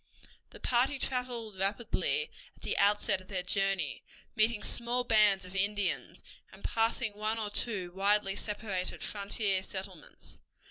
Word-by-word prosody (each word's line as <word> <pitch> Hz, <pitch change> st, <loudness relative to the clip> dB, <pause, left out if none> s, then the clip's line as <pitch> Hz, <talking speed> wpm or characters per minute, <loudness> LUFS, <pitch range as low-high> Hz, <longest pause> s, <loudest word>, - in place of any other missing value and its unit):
The -, -, -12 dB
party 255 Hz, +3 st, +3 dB
traveled 245 Hz, -6 st, -3 dB
rapidly 235 Hz, -, 0 dB, 0.2 s
at -, -, -22 dB
the -, -, 0 dB
outset 200 Hz, -2 st, +3 dB
of 185 Hz, -, -17 dB
their 185 Hz, -2 st, -2 dB
journey, 195 Hz, -5 st, +1 dB, 0.3 s
meeting 220 Hz, -1 st, +2 dB
small 240 Hz, +1 st, 0 dB
bands 210 Hz, -5 st, +4 dB
of 180 Hz, +1 st, -11 dB
Indians, 200 Hz, 0 st, 0 dB, 0.3 s
and -, -, -14 dB
passing 225 Hz, 0 st, +1 dB
one 215 Hz, +2 st, -1 dB
or 215 Hz, -2 st, -3 dB
two 200 Hz, -6 st, -2 dB
widely 195 Hz, +1 st, +2 dB
separated 205 Hz, -3 st, -3 dB
frontier 200 Hz, -1 st, 0 dB
settlements. 190 Hz, -3 st, -8 dB
205 Hz, 135 wpm, -31 LUFS, 195-225 Hz, 0.3 s, bands